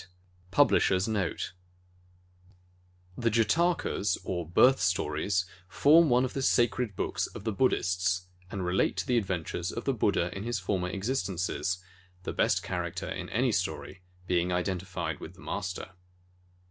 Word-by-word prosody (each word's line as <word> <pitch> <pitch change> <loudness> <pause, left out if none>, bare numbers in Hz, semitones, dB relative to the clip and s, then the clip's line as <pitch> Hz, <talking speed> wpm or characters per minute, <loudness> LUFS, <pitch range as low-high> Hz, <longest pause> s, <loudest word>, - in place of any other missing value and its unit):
90 90 0 -19 0.3
PUBLISHER'S 95 -6 +3
NOTE 105 -5 -2 1.6
The 115 +1 +1
Jatakas, 115 - +1
or 85 -3 -3
Birth 130 +9 +5
stories, 90 +1 +1 0.2
form 155 - +5
one 125 +1 +4
of 130 - -5
the 135 - -2
sacred 120 -4 +2
books - - -1
of - - -10
the 110 - -1
Buddhists 90 -5 +1 0.2
and 95 -2 -4
relate 90 +1 +1
to 95 - -1
the 125 -2 +3
adventures 90 -3 -3
of 115 - -5
the 135 - +2
Buddha 95 -6 +1
in 95 - -4
his 120 0 -1
former 90 -1 -1
existences, 95 -4 -2 0.4
the - - -4
best - - +1
char - - -2
acter - - -5
in - - -6
any - - +1
story 90 - -3 0.2
being 90 0 +1
identified 90 -3 -2
with 85 - -9
the 95 - -16
Master. 95 -2 -4
95 Hz, 145 wpm, -29 LUFS, 90-115 Hz, 1.6 s, Birth